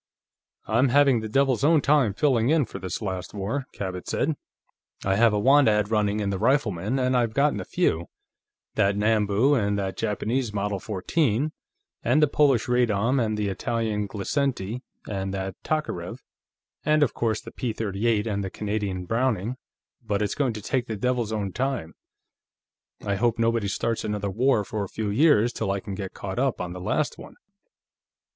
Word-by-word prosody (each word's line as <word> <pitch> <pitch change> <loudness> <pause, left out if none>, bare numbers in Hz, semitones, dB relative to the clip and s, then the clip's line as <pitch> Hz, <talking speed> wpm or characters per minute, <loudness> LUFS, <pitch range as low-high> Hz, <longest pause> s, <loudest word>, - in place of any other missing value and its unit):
"I'm 120 +5 +2
having 135 -2 +4
the 110 0 -5
devil's 135 +1 +2
own 160 +2 +5
time 140 -8 +3
filling 125 -4 +2
in 155 -3 +3
for - - -8
this 95 +4 -4
last 95 0 -4
war," 115 +8 -3
Cabot 95 -2 -5
said. 160 - 0 0.7
"I 95 0 +2
have 115 +2 +5
a 105 - 0
want 135 +6 +5
ad 105 -1 +2
running 105 -1 +1
in 100 -1 -1
the 95 - -2
Rifleman, 110 -3 +1
and 130 0 +1
I've 115 -3 +1
gotten 140 -6 +2
a - - -4
few: 80 +2 0 0.7
that 100 0 +2
Nambu, 105 +4 +3
and 100 -6 +1
that 95 -1 -3
Japanese 110 +2 -1
Model 100 0 -1
14, 115 - 0 0.5
and 125 +6 +3
the 150 - +5
Polish 140 -5 +3
Radom, 125 +1 +2
and 110 -1 -1
the 105 -1 -1
Italian 105 +1 -1
Glisenti, 115 +1 -2 0.3
and 95 -1 -3
that 95 0 -3
Tokarev, 150 - -3 0.6
and, 155 0 +3
of 130 - +1
course, 110 -2 0
the - - -10
P 125 - -3
'38 110 0 0
and 100 -3 -1
the 95 - -3
Canadian 100 -3 -3
Browning; 115 +1 0 0.5
but 105 -2 0
it's 105 - -1
going 135 -5 0
to 105 -2 -7
take 125 +1 -1
the 110 - -4
devil's 120 0 0
own 105 -3 -2
time. 130 - -2 1.1
I 100 -1 0
hope 120 +2 +1
nobody 115 -2 +1
starts 115 +3 -1
another 105 -2 -2
war, 120 +1 +2
for 105 0 -3
a 100 - -6
few 110 -2 -3
years, 120 -2 +4
till - - -2
I 100 0 0
can 100 0 -7
get 95 -1 -6
caught 95 +2 -4
up 135 -1 0
on 90 -1 -4
the 90 - -7
last - - -1
one." - - -11
110 Hz, 180 wpm, -25 LUFS, 100-125 Hz, 1.1 s, own